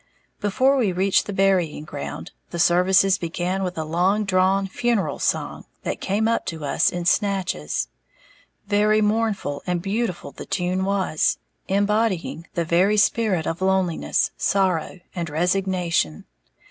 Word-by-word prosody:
Before 260 +7 +2
we 225 -7 +2
reached 190 +2 +2
the - - -3
burying 190 -6 +1
ground, 145 -2 -7 0.2
the 170 - -6
services 185 +3 +4
began 175 +3 -2
with 180 -2 -3
a 160 - -1
long 180 +7 +1
drawn 195 0 +2
funeral 200 -4 -1
song, - - -2 0.2
that - - -3
came 205 +3 0
up 230 - 0
to 160 -3 -4
us 140 - +2
in 175 -1 -4
snatches. 185 - 0 0.8
Very 210 +1 +3
mournful 210 -8 0
and 180 -1 0
beautiful 195 0 -3
the - - -10
tune 185 +1 -1
was, 195 -5 +1 0.3
embodying 200 -4 0
the 170 - 0
very 185 +6 +3
spirit 210 -5 +2
of 165 +2 -3
loneliness, 190 -3 +1
sorrow 185 -2 0
and 170 -2 -4
resignation. 175 - 0
190 Hz, 135 wpm, -23 LUFS, 170-200 Hz, 0.8 s, services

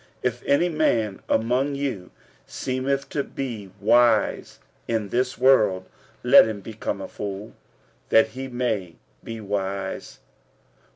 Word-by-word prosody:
If 120 0 -1
any 140 +5 +3
man 120 - 0
among 125 +5 +1
you 130 -10 -3 0.4
seemeth 135 +1 -2
to 140 - -1
be 115 -10 -6
wise 120 +3 +3 0.3
in 110 -3 -1
this 125 +3 0
world, 110 -8 +4 0.4
let 125 0 +8
him 110 -2 -4
become 110 +2 -5
a - - -5
fool, 100 +1 -6 0.6
that 110 0 +5
he 130 +4 -6
may 110 -9 -2 0.3
be 115 0 -6
wise. 100 -1 -4
115 Hz, 120 wpm, -24 LUFS, 105-130 Hz, 0.6 s, let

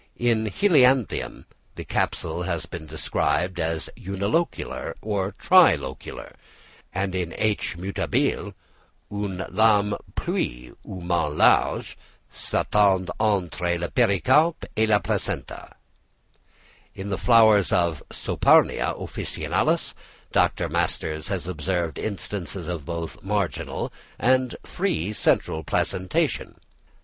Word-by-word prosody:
In 115 -2 +1
Helianthemum 130 - +2 0.3
the - - -7
capsule 80 +2 -1
has 85 -3 -2
been 85 -2 -8
described 80 +3 -1
as 80 0 -1
unilocular 100 - -2
or 100 -2 -2
tri - - +6
locular; - - -8 0.6
and 95 0 -2
in 90 -2 -3
H. 105 -5 0
mutabile, 95 +3 -1 0.6
"Une 100 -2 -3
lame 105 -2 +3 0.2
plus - - -3
ou 95 - -8
moins 85 -4 -1
large, - - +3 0.4
s'étend 95 -3 +1
entre 90 -4 0
le 85 0 -3
pericarpe 130 - +3
et 110 0 +2
le 105 -1 +5
placenta." - - -4 1.2
In 95 +1 -6
the 95 - 0
flowers 110 -4 +5
of 85 -4 +1
Saponaria - - +2
officinalis - - -1 0.4
Dr. - - +2
Masters 80 -1 -1
has - - -3
observed 85 -2 -2
instances 95 -3 -3
of 85 -5 -4
both 85 -1 -5
marginal 100 -2 -2 0.2
and 130 +1 +2
free 90 +7 -2
central 80 -5 +1
placentation. 95 +5 -1
95 Hz, 105 wpm, -24 LUFS, 85-105 Hz, 1.2 s, tri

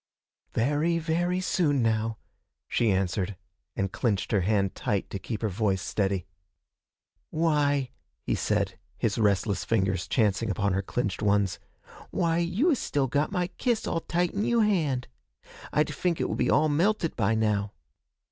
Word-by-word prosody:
'Very, 150 +8 +1
very 170 +3 0
soon 150 -8 +1
now,' 110 0 0 0.5
she 115 - +1
answered, 95 0 0 0.4
and 95 -1 -1
clinched 105 -6 -1
her 105 -4 +3
hand 100 0 +1
tight 100 -2 -1
to 100 - -3
keep 110 +1 -5
her - - +2
voice 100 -1 0
steady. 95 -4 -1 1.0
'Why,' 145 -5 +1 0.3
he - - -1
said, - - 0 0.2
his 110 0 0
restless 100 -2 +1
fingers 95 -5 0
chancing 110 -1 +1
upon 100 0 0
her 95 - +1
clinched 100 0 -2
ones, 100 -2 +2 0.5
'why, 165 -1 +1
you 185 - +2
is 275 - +1
still 140 -2 0
got 145 +6 0
my 180 -3 0
kiss 240 -3 +1
all 165 - 0
tight 175 +1 0
in 205 - -1
you 235 +1 +3
hand. 155 - +1 0.6
I'd 150 0 +1
fink 170 +3 -1
it - - 0
would - - -3
be - - +2
all 155 - +4
melted 170 +4 +1
by 110 0 +2
now.' 105 -2 0
115 Hz, 155 wpm, -27 LUFS, 100-165 Hz, 1.0 s, all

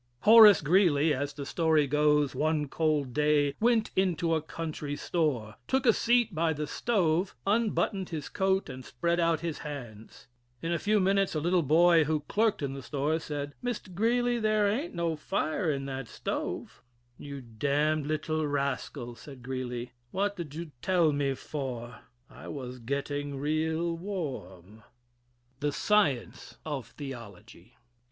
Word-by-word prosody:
Horace 215 -2 +9
Greeley, 160 -2 +3
as 140 +1 -2
the 140 0 -7
story 160 0 +2
goes, 150 0 +2
one 155 -1 0
cold 150 -3 0
day 150 0 +2
went 230 -1 +2
into 175 -3 +1
a 160 - +1
country 155 -2 -5
store, 135 -11 -1
took 265 0 +1
a - - +6
seat 235 -2 +2
by 165 0 +1
the 150 0 -3
stove, 180 -3 0
unbuttoned 205 -2 0
his 155 -4 -5
coat 190 0 0
and 130 -2 -8
spread 170 +9 -1
out 165 -2 +2
his 165 -3 -3
hands. 120 -8 -9 0.3
In 165 - -3
a 170 - 0
few 210 +4 +2
minutes, 195 -1 +2
a - - +1
little 175 +3 +2
boy 165 +2 +5
who 155 0 0
clerked 210 +1 0
in 135 -1 -2
the 135 - -6
store 150 +4 -1
said: 145 -2 -5
"Mr. 235 -6 -4
Greeley, 240 +4 +1
there 215 -1 +2
aint 240 - -2
no 170 -1 0
fire 155 +2 -1
in 135 -1 -3
that 135 -2 -5
stove." - - -5 0.4
"You 140 -1 -7
d 125 - -14 0.2
d 150 +2 +2
little 155 +1 -1
rascal," 140 -4 -2
said 130 +1 -12
Greeley, 125 -1 -4 0.2
"What 200 +6 -1
did 160 -6 -7
you 165 -1 -6
tell 175 -4 +3
me 140 -2 0
for, 125 -5 -6 0.3
I - - -12
was 125 -3 -6
getting 140 +3 -3
real 160 +3 0
warm." 130 - -6
III. 110 - -21 0.8
"THE 145 +1 0
SCIENCE 195 - 0
OF 140 -7 -4
THEOLOGY." 115 - -10
155 Hz, 155 wpm, -29 LUFS, 140-180 Hz, 0.8 s, Horace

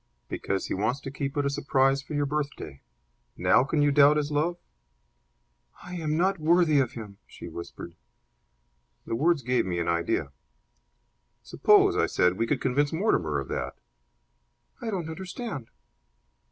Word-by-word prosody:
"Because 95 -1 -2
he - - -3
wants 110 +8 -1
to 135 - -6
keep 140 0 -4
it 145 - +1
a - - +2
surprise 135 0 +2
for 150 +2 -7
your 145 0 +1
birthday. 140 - -4 0.6
Now 90 +7 +4
can 145 +2 +1
you 145 - +3
doubt 145 +1 +6
his 150 0 -1
love?" 160 +4 0 1.3
"I 180 - -9
am 155 -3 -2
not 190 +2 +1
worthy 160 -1 +4
of 130 -4 0
him!" 105 -4 -9
she - - -10
whispered. 85 - -9 1.1
The - - -4
words 150 +4 +2
gave 125 +1 +1
me 90 -1 -2
an 85 - -1
idea. 85 -4 0 1.1
"Suppose," - - +4
I - - +2
said, 90 +1 +2
"we 115 - +1
could 130 +1 0
convince 140 +2 +1
Mortimer 160 - +1
of 70 -2 -4
that!" - - -3 1.1
"I 235 - -3
don't 180 -6 -3
understand." 180 - -6
140 Hz, 155 wpm, -27 LUFS, 115-155 Hz, 1.3 s, doubt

